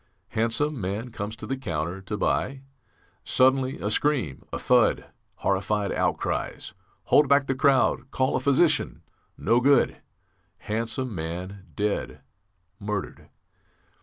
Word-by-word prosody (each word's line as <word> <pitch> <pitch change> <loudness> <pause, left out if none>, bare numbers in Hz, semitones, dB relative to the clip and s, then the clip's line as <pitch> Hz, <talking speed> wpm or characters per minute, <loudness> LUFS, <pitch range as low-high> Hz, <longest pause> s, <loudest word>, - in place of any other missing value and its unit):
Handsome 120 +5 0
man 105 +6 -3
comes 105 0 -5
to 110 - -8
the 135 - -2
counter 85 -6 -3
to 105 +2 -4
buy. 135 +5 0 0.6
Suddenly 130 +1 +2
a 105 - -2
scream, 125 - 0
a - - -2
thud, - - +3 0.3
horrified 100 +1 0
outcries. - - -2 0.3
Hold 145 -2 +4
back 140 0 +5
the 135 - 0
crowd! 130 -1 +2
Call 130 0 0
a - - +2
physician! 140 +3 +2 0.3
No 120 - +3
good; 140 +3 +3 0.6
handsome 115 +3 -3
man, 90 +4 -6
dead, 105 -1 -2 0.6
murdered. 105 -1 -5
115 Hz, 120 wpm, -26 LUFS, 100-135 Hz, 0.6 s, back